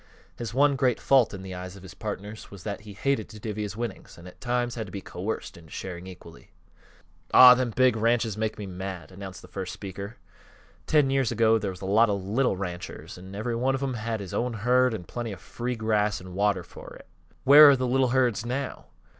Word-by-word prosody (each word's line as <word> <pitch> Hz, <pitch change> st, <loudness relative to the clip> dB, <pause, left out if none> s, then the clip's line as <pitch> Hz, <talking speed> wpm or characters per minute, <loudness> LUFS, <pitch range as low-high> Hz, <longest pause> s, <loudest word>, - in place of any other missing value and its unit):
His 115 Hz, -3 st, -5 dB
one 140 Hz, +3 st, +3 dB
great 125 Hz, -2 st, +1 dB
fault 135 Hz, -4 st, +4 dB
in 95 Hz, -2 st, -8 dB
the 95 Hz, -1 st, -7 dB
eyes 90 Hz, +1 st, -7 dB
of 100 Hz, -, -13 dB
his 95 Hz, -, -10 dB
partners 105 Hz, 0 st, -6 dB
was 100 Hz, -3 st, -11 dB
that 105 Hz, 0 st, -4 dB
he 105 Hz, -1 st, -11 dB
hated 115 Hz, +1 st, -1 dB
to 110 Hz, -, -11 dB
divvy 105 Hz, 0 st, -4 dB
his 105 Hz, 0 st, -5 dB
winnings 115 Hz, -4 st, -6 dB
and 85 Hz, +1 st, -12 dB
at 90 Hz, -, -14 dB
times 120 Hz, -1 st, -1 dB
had 110 Hz, -3 st, -5 dB
to -, -, -11 dB
be 100 Hz, -, -5 dB
coerced 95 Hz, +1 st, -5 dB
into 80 Hz, -2 st, -15 dB
sharing 90 Hz, +1 st, -7 dB
equally. 85 Hz, -3 st, -13 dB, 0.9 s
"Aw, 125 Hz, -1 st, +11 dB
them 125 Hz, -1 st, 0 dB
big 130 Hz, +1 st, +3 dB
ranches 115 Hz, -1 st, +1 dB
make 110 Hz, 0 st, -2 dB
me 105 Hz, -, -6 dB
mad," 95 Hz, -2 st, -6 dB
announced 95 Hz, -2 st, -9 dB
the -, -, -12 dB
first 95 Hz, -2 st, -5 dB
speaker. 100 Hz, +2 st, -7 dB, 0.7 s
"Ten 145 Hz, -3 st, +3 dB
years 135 Hz, -4 st, +1 dB
ago 115 Hz, -1 st, +3 dB
there 100 Hz, -2 st, -2 dB
was 90 Hz, -1 st, -8 dB
a -, -, -5 dB
lot 105 Hz, +4 st, +4 dB
of 100 Hz, -2 st, -1 dB
little 110 Hz, +1 st, +1 dB
ranchers, 90 Hz, -2 st, -6 dB
an' 95 Hz, +2 st, -10 dB
every 115 Hz, +3 st, -2 dB
one 130 Hz, +3 st, +1 dB
of 135 Hz, -, -3 dB
'em 135 Hz, -2 st, -1 dB
had 115 Hz, -2 st, -3 dB
his 95 Hz, -, -8 dB
own 125 Hz, 0 st, -1 dB
herd, 125 Hz, +2 st, +2 dB
an' 95 Hz, -, -6 dB
plenty 115 Hz, +5 st, -5 dB
of 95 Hz, -, -10 dB
free 125 Hz, +1 st, -4 dB
grass 105 Hz, -2 st, 0 dB
an' 90 Hz, 0 st, -10 dB
water 100 Hz, -1 st, +1 dB
fer 90 Hz, -, -12 dB
it. -, -, -15 dB, 0.4 s
Where 145 Hz, +2 st, +10 dB
are 140 Hz, -, +6 dB
th' 130 Hz, -, -5 dB
little 130 Hz, +1 st, +2 dB
herds 120 Hz, -4 st, +2 dB
now? 125 Hz, +3 st, -4 dB
110 Hz, 230 wpm, -26 LUFS, 95-125 Hz, 0.9 s, Aw